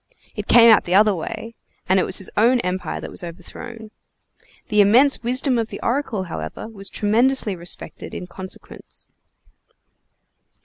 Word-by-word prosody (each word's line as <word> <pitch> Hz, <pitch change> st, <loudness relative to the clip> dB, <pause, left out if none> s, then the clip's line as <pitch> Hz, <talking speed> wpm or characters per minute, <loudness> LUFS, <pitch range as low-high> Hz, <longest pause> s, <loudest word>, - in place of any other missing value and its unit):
It 210 Hz, -1 st, -5 dB
came 235 Hz, -1 st, +7 dB
out 220 Hz, -, +5 dB
the 180 Hz, -, 0 dB
other 210 Hz, +1 st, +5 dB
way, 220 Hz, +6 st, -6 dB, 0.3 s
and 190 Hz, +1 st, +3 dB
it -, -, 0 dB
was 190 Hz, -, +2 dB
his 190 Hz, -, -4 dB
own 240 Hz, +4 st, +4 dB
empire 185 Hz, -1 st, -3 dB
that -, -, -8 dB
was -, -, -2 dB
overthrown. 215 Hz, +6 st, -10 dB, 0.8 s
The 210 Hz, -2 st, +4 dB
immense 245 Hz, +8 st, +4 dB
wisdom 250 Hz, +1 st, +1 dB
of 225 Hz, -, -1 dB
the -, -, -8 dB
oracle, 235 Hz, -5 st, -1 dB
however, 80 Hz, -, -6 dB
was 200 Hz, -3 st, -7 dB
tremendously 220 Hz, 0 st, +1 dB
respected 170 Hz, 0 st, -6 dB
in -, -, -6 dB
consequence! 185 Hz, +1 st, -9 dB
210 Hz, 150 wpm, -21 LUFS, 190-235 Hz, 0.8 s, came